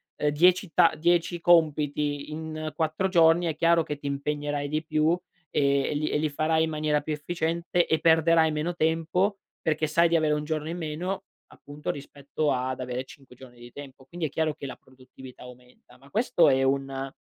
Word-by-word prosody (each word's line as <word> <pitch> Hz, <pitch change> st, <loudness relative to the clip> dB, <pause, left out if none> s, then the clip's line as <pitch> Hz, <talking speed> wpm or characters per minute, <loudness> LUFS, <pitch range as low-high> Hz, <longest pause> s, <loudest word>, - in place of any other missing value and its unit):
ehm, 150 Hz, -, 0 dB
10 175 Hz, +4 st, +3 dB
ta 170 Hz, -3 st, +5 dB
10 175 Hz, +1 st, +1 dB
compiti 150 Hz, -3 st, +2 dB
in 155 Hz, 0 st, -5 dB
4 160 Hz, +4 st, 0 dB
giorni 170 Hz, -1 st, +4 dB
è 160 Hz, -, -2 dB
chiaro 165 Hz, +1 st, +3 dB
che 150 Hz, -1 st, -5 dB
ti 145 Hz, -, -7 dB
impegnerai 145 Hz, 0 st, -2 dB
di 155 Hz, +1 st, -2 dB
più 155 Hz, 0 st, +1 dB, 0.4 s
e 140 Hz, -1 st, +2 dB
e -, -, -1 dB
li 150 Hz, +1 st, -1 dB
e -, -, 0 dB
li 155 Hz, 0 st, 0 dB
farai 160 Hz, +2 st, +1 dB
in 160 Hz, -, -1 dB
maniera 150 Hz, -1 st, 0 dB
più 155 Hz, +1 st, -4 dB
efficiente 170 Hz, +2 st, -1 dB
e 160 Hz, -, +1 dB
perderai 160 Hz, 0 st, +4 dB
meno 155 Hz, +3 st, -2 dB
tempo 165 Hz, +5 st, 0 dB, 0.2 s
perché 155 Hz, 0 st, 0 dB
sai 170 Hz, +3 st, +3 dB
di 170 Hz, -, +2 dB
avere 155 Hz, -2 st, +2 dB
1 150 Hz, 0 st, -2 dB
giorno 155 Hz, 0 st, -3 dB
in 170 Hz, -, -4 dB
meno 175 Hz, +4 st, -4 dB, 0.3 s
appunto 145 Hz, +1 st, -6 dB
rispetto 145 Hz, +1 st, -4 dB
ad 130 Hz, 0 st, -2 dB
avere 125 Hz, 0 st, -4 dB
5 135 Hz, -1 st, -16 dB
giorni 125 Hz, -1 st, -15 dB
di 120 Hz, 0 st, -12 dB
tempo. 135 Hz, -1 st, -12 dB
Quindi 170 Hz, +3 st, -5 dB
è -, -, -9 dB
chiaro 155 Hz, +1 st, -1 dB
che -, -, -9 dB
la 135 Hz, -, -7 dB
produttività 130 Hz, 0 st, -15 dB
aumenta, 125 Hz, 0 st, -16 dB
ma 135 Hz, +2 st, -19 dB
questo 210 Hz, -, +2 dB
è 135 Hz, -1 st, +2 dB
un 135 Hz, 0 st, -1 dB
155 Hz, 195 wpm, -26 LUFS, 140-165 Hz, 0.4 s, ta